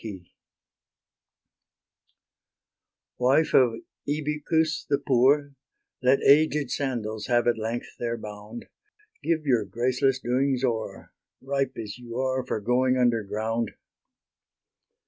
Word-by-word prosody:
Wife 135 +6 +3
of 125 -3 +5 0.4
Ibycus 155 +2 0
the 140 - +3
poor, 140 +2 +2 0.5
Let 130 +2 +3
aged 150 -2 +4
scandals 110 -6 -3
have 120 -1 +2
at 120 -2 +1
length 115 +2 -4
their 120 0 -2
bound: 105 +1 -9 0.6
Give 160 -2 0
your 120 -6 +3
graceless 125 +6 +1
doings 130 +1 0
o'er, 115 -4 -3 0.3
Ripe 135 -1 -2
as 110 +1 -6
you 120 -1 -8
are 130 0 0
for 125 - -3
going 125 +4 +2
underground. 115 -1 0
125 Hz, 100 wpm, -26 LUFS, 115-140 Hz, 0.6 s, of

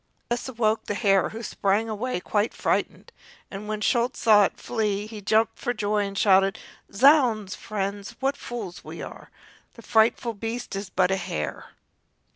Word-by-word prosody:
This 240 +2 -2
awoke 220 -3 0
the 205 - -2
hare, 195 -3 +3
who 225 +2 -7
sprang 205 +1 0
away 225 0 -2
quite 205 +4 -1
frightened, - - -1 0.4
and 205 +1 -7
when 215 0 -3
Schulz 240 +4 +1
saw 210 -2 +6
it - - -4
flee, 210 -3 -1
he 215 -1 -9
jumped 220 +2 +1
for 245 - -2
joy 205 -1 0
and 195 0 -7
shouted: 195 -1 +4 0.3
"Zounds, 235 -5 +4
friends, 200 -1 -4
what 275 +1 0
fools 210 -7 -7
we - - -8
are! - - -10 0.5
The 230 - -13
frightful 225 +2 +2
beast 225 +2 -5
is 195 0 -5
but 185 0 +2
a 190 - +2
hare!" 75 - -5
215 Hz, 165 wpm, -25 LUFS, 200-230 Hz, 0.5 s, saw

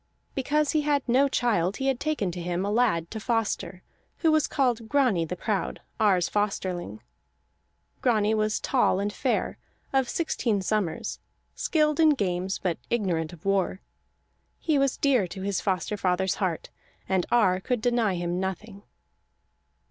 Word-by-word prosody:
Because 290 +2 +1
he 310 - +2
had 290 -2 0
no 260 +4 +4
child 210 -8 +1
he 270 - -3
had 265 -2 +1
taken 290 -12 -1
to 175 0 -6
him 175 +2 -2
a 205 - -1
lad 210 -8 +1
to 220 - -4
foster, 215 -5 -2 0.3
who 325 - +3
was 310 -2 +3
called 245 -5 0
Grani 250 - +2
the 180 - -4
Proud, 205 +1 -2 0.2
Ar's 195 -5 +3
Fosterling. 185 - -2 1.0
Grani 220 -4 +2
was 215 0 +1
tall 245 -7 +2
and 205 +1 -2
fair, 255 +2 -1 0.3
of 265 -2 +2
sixteen 240 -10 0
summers, 190 -5 -1 0.3
skilled 305 -1 +1
in 310 -2 +6
games 190 -3 -1
but 175 -4 -2
ignorant 175 -9 0
of 175 -1 -14
war. 195 -1 +1 0.8
He 310 -4 +1
was 275 -1 +1
dear 255 -9 +2
to 190 +2 -7
his 200 -1 -1
foster 190 +1 -1
father's 190 -1 0
heart, 180 -4 -2 0.4
and 190 -2 +1
Ar 185 -6 +3
could 245 +5 -1
deny 230 -4 +1
him 175 0 -2
nothing. 195 +2 -5
210 Hz, 155 wpm, -26 LUFS, 185-255 Hz, 1.0 s, in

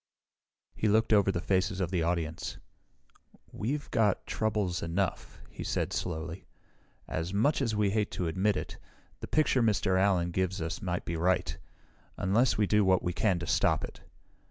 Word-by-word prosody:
He 110 - -1
looked 110 +2 +3
over 100 -2 +4
the 85 - -2
faces 95 +1 0
of 90 -2 -1
the 90 -3 +1
audience. 80 -1 -2 0.9
"We've 140 +7 -3
got 105 -5 +2
troubles 105 -5 -1
enough," 90 +3 -2
he - - -7
said - - -1
slowly. 85 +1 -4 0.6
"As 85 +5 -3
much 140 +9 +2
as 115 -5 0
we 105 -2 +2
hate 105 0 0
to 90 - -2
admit 95 +4 +1
it, - - -5 0.4
the - - -6
picture 150 -4 +2
Mr. 100 -4 +2
Allen 90 -3 +2
gives 95 +1 -1
us 80 +4 -4
may 90 -3 -1
be 85 - -3
right 90 +2 +1 0.6
unless 110 +7 +2
we 105 - +3
do 105 +1 +3
what 95 -2 +3
we 90 - -1
can 95 0 +1
to 85 - -4
stop - - +2
it. - - -8
95 Hz, 170 wpm, -30 LUFS, 90-105 Hz, 0.9 s, over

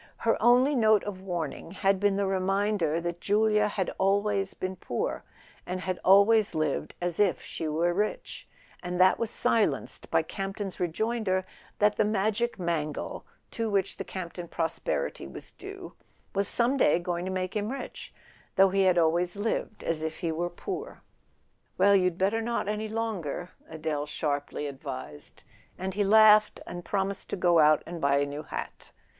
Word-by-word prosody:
Her - - +2
only 250 +4 +5
note 220 -5 +4
of 195 -2 -6
warning 170 -6 -4
had 195 -1 +1
been 200 0 +2
the 200 0 0
reminder 195 -3 0
that 175 0 -4
Julia 210 0 +3
had 195 -3 -2
always 195 0 +1
been 185 0 -4
poor, - - -3 0.4
and 185 0 -4
had 185 +1 -3
always 200 +1 +5
lived 155 -3 -1
as 175 -1 -2
if 205 -4 +3
she 160 - -5
were 165 +3 +1
rich; 210 +4 -3 0.3
and 180 0 -4
that 185 +1 +5
was 230 - 0
silenced 220 0 +1
by - - +2
Campton's 195 -1 -5
rejoinder 190 +1 -1 0.3
that 210 0 +3
the - - +4
Magic 215 +3 0
Mangle, 165 -5 -3 0.2
to 225 -1 -2
which 195 -2 0
the - - -4
Camp 180 -3 -6
ton 175 -1 -7
prosperity 165 - -2
was 70 - -9
due, - - -10 0.4
was 200 0 +2
some 245 +5 +3
day 165 - +4
going 175 0 -3
to 185 - -3
make 185 0 -3
him 210 +2 -1
rich, 275 - -7 0.4
though 195 0 +6
he 195 +1 +1
had 185 -2 +4
always 170 +3 +2
lived 215 0 -2
as 165 -2 -1
if 160 0 -4
he 170 -3 -2
were 170 +2 -2
poor. 395 - -7 0.7
"Well—you'd 185 -2 +4
better 200 +4 +1
not, 235 -2 -2
any 210 +1 -2
longer," 200 -7 -3 0.2
Adele 155 -2 -3
sharply 145 -1 -3
advised; 135 - -8 0.3
and 190 +1 -4
he 205 +2 +1
laughed, 215 +1 +6
and 175 - -7
promised 195 +2 -2
to - - -2
go 175 -2 +3
out 155 -1 +5
and 170 -1 -7
buy 140 0 +3
a 140 - +2
new 145 +1 -5
hat. 155 - -7
190 Hz, 170 wpm, -28 LUFS, 170-210 Hz, 0.7 s, though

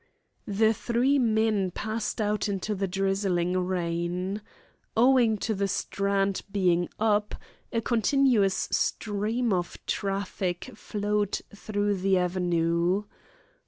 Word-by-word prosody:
The 220 +2 +3
three 250 +6 +1
men 220 -4 +2
passed 215 +5 -3
out 210 0 0
into 200 +2 -2
the 195 -1 -1
drizzling 190 -2 0
rain. 180 +2 -1 0.6
Owing 240 -2 +5
to 220 +2 -1
the 200 -1 0
Strand 195 0 0
being 175 -3 +2
"up," 210 -1 +1 0.4
a 230 - 0
continuous 235 -3 +2
stream 220 +2 0
of 175 -1 -2
traffic 195 -2 -2
flowed 210 -1 -1 0.2
through 205 -1 -1
the 190 0 +2
Avenue. 175 +1 +1
200 Hz, 105 wpm, -27 LUFS, 185-215 Hz, 0.6 s, Owing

